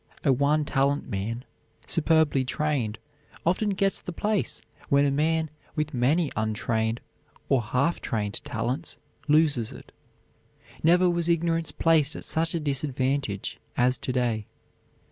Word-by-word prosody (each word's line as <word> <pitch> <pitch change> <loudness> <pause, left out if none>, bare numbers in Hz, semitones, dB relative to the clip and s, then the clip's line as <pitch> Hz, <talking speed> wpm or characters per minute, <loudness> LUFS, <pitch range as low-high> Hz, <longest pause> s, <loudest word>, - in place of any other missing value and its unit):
A 140 - +4
one 145 +3 +2
talent 140 +1 +1
man, 115 +6 -3 0.4
superbly 160 -4 +3
trained, 130 -6 -1 0.5
often 185 +5 +2
gets 195 0 +1
the 180 - -6
place 205 +3 -1 0.3
when 140 0 +4
a 140 - +2
man 160 +2 +1 0.2
with 150 0 -1
many 140 +6 +2
untrained 110 +1 -1 0.5
or 135 -3 +4
half 125 +9 0
trained 105 -3 -2
talents 125 +8 -3 0.3
loses 145 -6 +3
it. 125 - -12 0.9
Never 175 +3 +5
was 175 -1 +1
ignorance 165 -1 +1
placed 160 -3 +2
at - - -8
such 165 +1 0
a - - 0
disadvantage 135 -6 -1 0.2
as 125 +1 +3
to - - -3
day. 120 -4 0
145 Hz, 130 wpm, -26 LUFS, 125-160 Hz, 0.9 s, Never